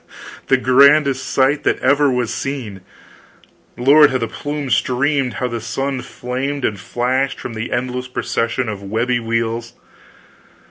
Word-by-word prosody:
The 135 - +4
grandest 135 +1 +4
sight 135 +2 +2
that - - +1
ever 140 +1 +3
was 120 -2 -1
seen. 120 -6 -5 1.0
Lord, 145 +4 +6
how 130 - 0
the 115 -2 -2
plumes 145 +3 -2
streamed, 135 0 0
how 125 - -2
the 120 -2 -4
sun 135 +3 -3
flamed 130 +4 -4
and 105 -2 -2
flashed 130 +6 -1
from 120 - -6
the 110 +1 -5
endless 125 +1 -2
procession 120 0 -2
of 105 -2 -5
webby 115 +5 -1
wheels! 115 0 -2
125 Hz, 140 wpm, -18 LUFS, 115-135 Hz, 1.0 s, Lord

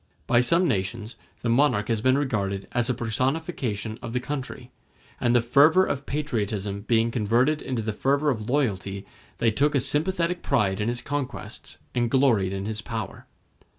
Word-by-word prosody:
By 120 0 +4
some 170 +8 +3
nations 110 - -2 0.3
the 120 - -1
monarch 120 -4 +3
has 115 -3 0
been 130 +2 +3
regarded 100 -8 -1
as 120 0 +1
a 125 - +1
personification 120 - -2
of 115 -1 -6
the 125 - +1
country; 130 -1 -6 0.5
and 120 0 +2
the 120 - +4
fervor 150 +10 +5
of 140 +1 -3
patriotism 105 -9 -2
being 115 +2 +1
converted 120 +7 +2
into 120 -4 -3
the 110 0 -2
fervor 140 +6 +1
of 110 -3 -4
loyalty, 100 -8 -1 0.3
they 115 - +2
took 145 +6 +1
a - - +4
sympathetic 170 +5 0
pride 105 -7 +1
in 105 - 0
his 120 0 -1
conquests, 145 -2 -5 0.2
and 120 -1 +1
gloried 120 -8 +3
in 95 0 -4
his 105 -1 -3
power. 110 -3 -6
120 Hz, 170 wpm, -25 LUFS, 105-140 Hz, 0.5 s, fervor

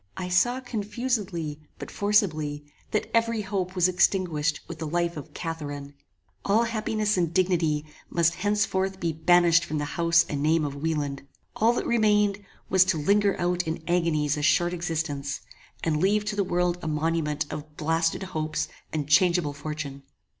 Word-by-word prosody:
I 180 -1 -4
saw 240 +8 +3
confusedly, 210 - -3 0.2
but - - -8
forcibly, 155 -8 +1 0.2
that 215 - -2
every 230 -1 +2
hope 190 -2 -3
was 180 -1 +4
extinguished 175 -5 +1
with 170 -2 -8
the 160 - -3
life 170 +2 0
of 150 - -9
CATHARINE. 145 -4 -5 0.5
All 215 +4 +3
happiness 215 -2 0
and 170 -3 +1
dignity 170 -5 +1 0.2
must 170 -1 +2
henceforth 195 0 0
be 165 -3 -1
banished 170 +1 +4
from 155 - -3
the 145 - -1
house 170 +2 +3
and 145 -1 -3
name 155 +1 +2
of 140 - -3
Wieland: 145 -2 -2 0.3
all 230 +2 +3
that - - -2
remained 210 -3 +2 0.2
was 190 -1 +5
to 190 -3 +1
linger 200 +6 +2
out 175 0 0
in 160 0 -3
agonies 160 -4 +1
a - - -2
short 175 +3 +3
existence; 160 -5 -3 0.4
and 155 -2 0
leave 210 +2 +2
to 210 0 -2
the 205 - +1
world 180 -1 0
a - - -5
monument 155 -1 0
of 150 0 -8
blasted 165 +3 0
hopes 155 -4 -2 0.2
and 150 -3 -2
changeable 170 0 +3
fortune. 145 -1 -6
170 Hz, 160 wpm, -26 LUFS, 155-195 Hz, 0.5 s, was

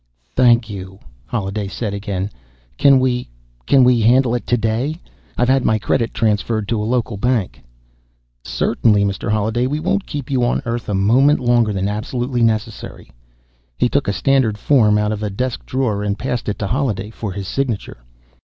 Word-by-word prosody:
"Thank 120 -2 +4
you," 95 -2 -8 0.3
Holliday 100 -2 -3
said 105 +1 -4
again. 100 -1 -3 0.5
"Can 140 -1 +6
we... 125 -1 0 0.4
can 135 -2 +5
we 125 -2 +4
handle 120 +2 +4
it 120 - -3
today? 120 +7 0 0.4
I've 125 - +2
had 135 0 +3
my 110 - +2
credit 115 +2 0
transferred 110 -1 0
to 115 -2 0
a 105 - -2
local 120 -4 -1
bank." 120 -3 -1 0.8
"Certainly, 105 - +1
Mr. 100 +3 -3
Holliday. 110 +4 0
We 145 +3 -2
won't 190 +5 -1
keep 145 -2 -5
you 130 -2 +1
on 120 - 0
Earth 115 -1 -3
a 100 - 0
moment 125 +10 +4
longer 120 -3 +2
than 95 -1 -1
absolutely 120 +4 -2
necessary." 110 -1 -2 0.7
He 125 - +2
took 140 +2 0
a 100 - +1
standard 130 -4 +1
form 110 -5 +3
out 105 0 0
of 105 -1 -4
a 105 - -2
desk 125 +5 -4
drawer 125 -6 -1
and 100 0 -2
passed 125 -1 -3
it 105 - -3
to 105 - -3
Holliday 110 -4 -2
for 110 -2 -5
his 100 0 -6
signature. 120 - -3
115 Hz, 175 wpm, -19 LUFS, 105-125 Hz, 0.8 s, Can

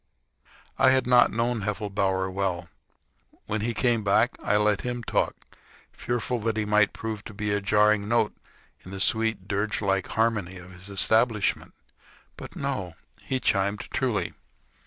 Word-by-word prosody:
I - - +6
had 130 -1 +3
not 125 0 +5
known 115 0 -1
Heffelbower 95 -2 -1
well. 90 -3 -2 0.8
When 110 0 -2
he 115 +1 -2
came 120 -2 +1
back, 100 +5 +3
I 105 - +2
let 105 -1 +2
him 120 -1 -4
talk, - - 0 0.6
fearful 120 0 -2
that 110 0 -1
he 110 - 0
might 105 -1 +3
prove 110 -2 -5
to 110 - -9
be 105 0 -2
a 100 - 0
jarring 105 +1 +3
note 115 -1 +1 0.5
in - - -11
the 95 0 -6
sweet, 110 -2 +2
dirgelike 100 -2 -1
harmony 110 -5 0
of 90 +1 -12
his 90 +2 -10
establishment. 110 +2 +1 0.6
But, - - -10
no. 130 -12 -3 0.3
He 130 - -2
chimed 100 -2 0
truly. - - -1
105 Hz, 150 wpm, -26 LUFS, 100-115 Hz, 0.8 s, I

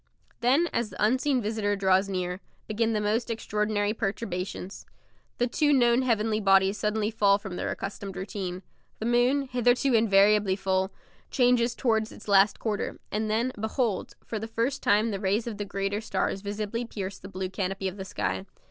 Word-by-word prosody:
Then, 270 +8 +3
as 235 -2 0
the - - -4
unseen 260 +2 +1
visitor 210 -1 0
draws 190 0 +2
near, 180 -1 -2 0.3
begin 225 +1 0
the 215 - +1
most 215 +3 0
extraordinary 210 -2 -1
perturbations. 195 -3 -4 0.5
The 245 - +2
two 295 +5 +1
known 240 -2 +4
heavenly 220 -3 +1
bodies 195 0 +4
suddenly 210 0 0
fail 200 -2 +4
from 195 -3 -7
their - - -2
accustomed 195 -1 -5
routine. 190 -1 -5 0.3
The 220 - -5
moon, 245 +4 +3
hitherto 245 +1 +2
invariably 205 -2 +4
full, 190 0 0 0.4
changes 245 -2 +3
towards 220 -3 +1
its - - -13
last 200 0 +5
quarter 215 -3 -3
and 215 +1 -1
then, 230 +4 +1
behold! 220 -2 -1
for 220 - -4
the 220 - -5
first 235 +4 -1
time 210 +3 +3
the 195 - -3
rays 205 +3 0
of 220 -3 -5
the 205 - -2
greater 195 +1 -2
stars 195 -2 -1
visibly 210 +3 -3
pierce 200 -4 -6
the 195 - -10
blue 190 -1 -4
canopy 195 0 -2
of 190 +1 -5
the 190 - -5
sky. 95 - -3
210 Hz, 175 wpm, -27 LUFS, 195-230 Hz, 0.5 s, last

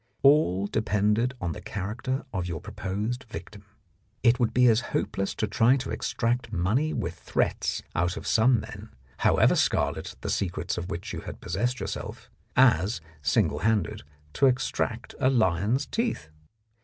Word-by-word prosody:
All 135 - +5
depended 105 +4 +1
on 90 -3 -2
the - - -7
character 115 +8 -3
of 90 -2 -2
your 85 -3 -3
proposed 105 - -4
victim. 105 -3 -9 0.6
It 120 -1 +4
would 120 -3 +2
be 125 0 +4
as 115 -2 +5 0.2
hopeless 95 0 -2
to - - 0
try 115 +5 +3
to 135 - -4
extract 115 0 -1
money 110 - +1
with 85 - -2
threats - - -1
out 90 +2 0
of - - -7
some 115 +2 +4
men, - - -9 0.3
however - - +4
scarlet - - 0
the - - -4
secrets 85 -2 -1
of 90 +2 -5
which 85 -2 -5
you - - -4
had - - -8
possessed 125 +1 -1
yourself, 115 +4 -6 0.2
as, 115 -6 +4 0.2
singlehanded, 95 +6 +1 0.3
to 135 - +4
extract 125 -2 -1
a 130 - +4
lion's 110 - +2
teeth. 230 - -2
110 Hz, 150 wpm, -27 LUFS, 95-125 Hz, 0.6 s, All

